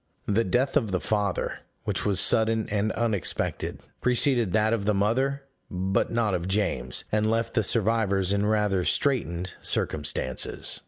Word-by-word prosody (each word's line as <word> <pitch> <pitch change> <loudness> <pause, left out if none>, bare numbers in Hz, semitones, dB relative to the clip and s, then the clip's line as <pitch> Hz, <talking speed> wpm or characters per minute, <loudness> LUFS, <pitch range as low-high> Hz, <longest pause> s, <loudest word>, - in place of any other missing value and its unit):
The 105 +3 +1
death 125 +8 0
of 110 - 0
the 95 - 0
father, 105 -2 -1 0.2
which - - -1
was 100 -3 +2
sudden 110 +1 +2
and 105 +1 0
unexpected, 110 -5 -1 0.2
preceded 125 -4 +2
that 110 +1 +2
of 105 -3 -1
the 105 0 +2
mother, 130 +8 0 0.3
but 95 +2 -1
not 115 -3 0
of 90 -1 -2
James, 95 -11 0
and 110 0 +1
left 115 +1 -1
the 110 - +1
survivors 100 -3 +2
in 100 +1 +1
rather 105 -3 +1
straitened 90 - 0
circumstances. 75 -3 0
105 Hz, 150 wpm, -26 LUFS, 95-115 Hz, 0.3 s, was